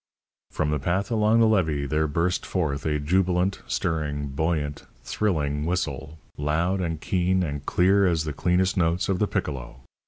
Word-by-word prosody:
From 75 -1 -1
the 75 - 0
path 95 - -1
along 110 +1 +3
the 115 - +5
levee 80 -9 +1
there 75 +3 0
burst 85 +4 0
forth 75 -5 -2
a 75 -1 +1
jubilant, 90 +4 +1
stirring, 75 -3 -2
buoyant, 75 0 -2 0.2
thrilling 75 -8 -1
whistle, 80 -4 -3 0.2
loud 85 +6 0
and 80 -3 -2
keen 90 +2 +1
and 70 -3 -4
clear 95 +2 +4
as 85 -3 +1
the 75 -2 -4
cleanest 90 +5 +1
notes 85 +1 +1
of 95 -2 +1
the 105 - +2
piccolo. 70 -10 -4
85 Hz, 160 wpm, -25 LUFS, 75-95 Hz, 0.2 s, the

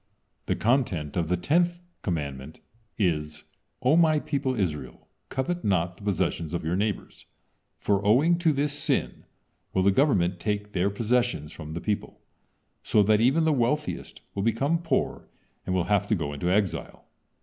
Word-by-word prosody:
The - - +1
content 105 - 0
of 85 -2 0
the 90 - +2
tenth 175 - +1 0.2
commandment 75 -4 -4 0.4
is: 75 -6 -1 0.4
"O 130 +5 +5
My 160 -2 +4
people 135 -4 -2
Israel, 75 -9 -3 0.2
covet 175 +7 -2
not 90 -3 +1
the - - -17
possessions 85 -4 -1
of 85 - -3
your 85 +2 0
neighbors, 105 +1 -3 0.5
for 100 -1 0
owing 145 +12 +4
to 165 -2 +3
this 145 0 0
sin 145 - -2 0.5
will 95 - +3
the 100 - +5
government 95 - +2
take 105 +1 -2
their 95 +1 +1
possessions 115 -7 0
from 80 -2 -8
the 85 - -4
people, 105 -2 -3 0.6
so 105 - +3
that 105 +1 +3
even 135 +8 +4
the 160 -1 +3
wealthiest 145 +4 -1
will 100 - -2
become 135 +10 +1
poor 160 -6 -1 0.4
and 95 - 0
will 90 - +2
have 100 +1 +1
to 110 - +2
go 75 -5 -3
into 75 +5 -2
exile." 95 -4 -1
105 Hz, 160 wpm, -26 LUFS, 85-135 Hz, 0.6 s, O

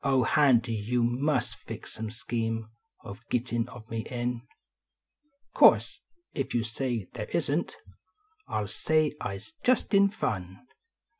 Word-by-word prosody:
Oil, 135 -2 +3
Handy, 125 -4 +4
you 115 +3 0
must 130 +6 0
fix - - -9
some 110 0 -5
scheme 115 -2 -3 0.3
Of 100 +2 -8
gittin 120 -1 0
of 115 -2 -11
me 115 - -2
in. 120 -1 -2 1.1
Course, - - +5 0.3
if 135 -5 -2
you 120 - +2
say 115 -3 -3
they - - -5
isn - - +1
t, - - -14 0.7
I - - -1
ll 105 - -3
say 155 +7 +1
I 100 - -2
s 100 - -12
just 250 -3 +2
in 200 0 +6
fun. 95 - -4
120 Hz, 145 wpm, -28 LUFS, 115-135 Hz, 1.1 s, in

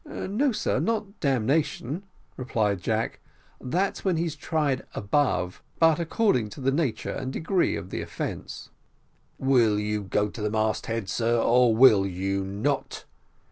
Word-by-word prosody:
"No, 250 +9 -1
sir, 215 - 0
not 215 -2 -2
damnation," 140 - 0 0.3
replied 105 -7 -1
Jack, 110 +3 -1 0.4
"that's 180 +10 -1
when 185 -4 +1
he's 165 -2 -1
tried 150 -4 -1
above; 100 -5 0 0.2
but 165 0 +4
according 170 - +1
to 105 - -11
the 135 0 +1
nature 140 -4 -1
and 130 -1 -4
degree 175 +6 0
of - - -7
the - - -3
offence - - -6 0.3
" - - -40
"Will 115 -5 +4
you 105 0 -1
go 105 +1 0
to 105 +2 -8
the 105 - 0
mast 110 0 0
head, 115 -3 -2
sir, 115 +3 +1
or 120 0 +4
will 110 -5 +6
you 95 +1 -2
not?" 105 +9 -2
125 Hz, 150 wpm, -26 LUFS, 105-160 Hz, 0.4 s, will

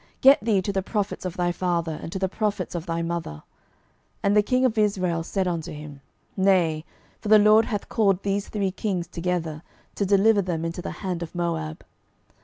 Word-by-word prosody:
get 270 -4 +7
thee 210 -4 +2
to 200 - -2
the 195 - 0
prophets 205 0 -3
of 185 +1 -4
thy 175 -1 +1
father, 170 -3 -1
and - - -7
to - - -3
the 190 0 0
prophets 205 -2 -2
of 170 0 -5
thy 165 0 -1
mother. 165 - -4 0.8
And 200 +1 +3
the 210 - +7
king 255 +5 +1
of 240 -3 +1
Israel 185 -6 +1
said 185 +3 -1
unto 170 -1 -3
him, 150 -2 -9 0.3
Nay: 180 -5 +2 0.3
for 210 - -5
the 215 - +9
LORD 215 +2 +6
hath 205 -4 -3
called 200 -4 +1
these 200 0 -1
three 200 -3 -1
kings 185 -3 -2
together, 170 -3 -3 0.3
to - - -1
deliver 200 +2 +4
them 170 -3 -2
into 165 +1 -4
the - - -5 0.2
hand 180 -2 -2
of 170 +1 -7
Moab. 165 -2 -3
185 Hz, 200 wpm, -25 LUFS, 170-205 Hz, 0.8 s, the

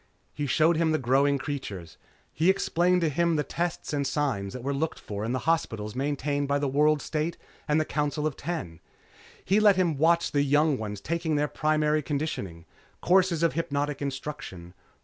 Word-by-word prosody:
He 145 -1 -3
showed 155 +5 +3
him 165 -1 +2
the - - +3
growing 140 +2 +2
creatures. 105 - -6 0.4
He 165 +4 +2
explained 180 -1 +2
to 165 - +2
him 170 +3 +1
the 150 - +1
tests 170 -1 -3
and 140 -2 0
signs 130 -9 -1
that 125 - -7
were 140 +2 -1
looked 155 +3 -2
for 105 0 -6
in 115 - -2
the 130 - 0
hospitals 110 -10 0
maintained 145 +1 -1
by 140 0 +1
the 145 0 -1
World 150 +2 +2
State 160 +2 -2 0.3
and 150 0 +3
the 155 - 0
Council 150 0 -1
of 155 -3 -1
Ten. 120 - -5 0.7
He 195 +3 +3
let 210 -2 +6
him 170 -6 +1
watch 170 +2 +3
the 145 - +2
young 145 +1 +3
ones 105 -2 -5
taking 165 -1 -1
their 150 0 +1
Primary 155 0 +1
Conditioning. 140 - -4 0.3
Courses 180 -2 +3
of 165 - +3
hypnotic 145 -3 -2
instruction. 135 -11 -6
150 Hz, 185 wpm, -27 LUFS, 135-160 Hz, 0.7 s, let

